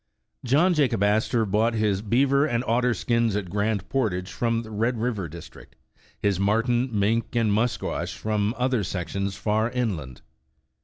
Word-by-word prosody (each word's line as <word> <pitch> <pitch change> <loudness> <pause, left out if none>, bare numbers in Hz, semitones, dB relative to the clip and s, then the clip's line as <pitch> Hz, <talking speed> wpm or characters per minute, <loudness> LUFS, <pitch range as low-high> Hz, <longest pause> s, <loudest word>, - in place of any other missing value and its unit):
John 150 +9 +3
Jacob 130 - +1
Astor 110 +2 +2
bought 110 +3 +1
his 105 -3 +1
beaver 135 +6 +2
and 120 -4 -1
otter 120 +1 +1
skins 115 -2 +1
at 95 -4 -3
Grand 100 -1 -1
Portage 100 -8 -1
from 115 -1 -1
the 110 - -11
Red 115 +3 0
River 110 -6 -2
district, 85 +2 -12 0.4
his 100 -3 0
mar 105 +3 +2
ten, 120 +1 0
mink 110 +3 0
and 115 -3 +2
musquash 115 +3 -1
from 105 0 -1
other 125 -3 +1
sections 100 +1 -3
far 110 +3 0
inland. 95 - -3
110 Hz, 155 wpm, -25 LUFS, 100-120 Hz, 0.4 s, John